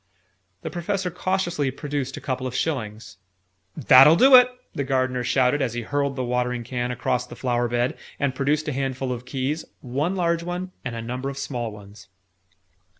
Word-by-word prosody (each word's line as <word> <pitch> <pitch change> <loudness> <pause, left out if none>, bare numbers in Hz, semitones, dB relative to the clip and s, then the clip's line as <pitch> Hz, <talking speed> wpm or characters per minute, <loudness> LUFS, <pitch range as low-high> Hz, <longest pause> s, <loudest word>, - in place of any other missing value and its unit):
The - - -4
Professor 180 +1 -2
cautiously 175 -5 -1
produced 140 0 -4
a - - -7
couple 130 -1 -3
of 125 - -6
shillings. 110 - -3 0.6
"That'll 135 +2 +8
do 265 +9 +6
it!" 250 0 +8 0.2
the 140 - -2
Gardener 130 -2 0
shouted, 130 +3 +2
as 120 -3 -1
he 120 - -3
hurled 140 +2 -1
the 130 - -2
watering 125 0 -1
can 125 +1 -3
across 125 0 -1
the - - -10
flower 120 -1 0
bed, 120 +1 0 0.2
and 140 -3 0
produced 145 +3 0
a 150 - -1
handful 135 -1 -2
of 125 0 -5
keys 135 +4 -2 0.2
one 145 +9 -1
large 170 -2 +1
one, 180 +2 -4
and 125 -2 -4
a 115 - -5
number 125 +3 -4
of 140 - -7
small 120 -5 -3
ones. 100 -1 -13
130 Hz, 180 wpm, -24 LUFS, 125-150 Hz, 0.6 s, That'll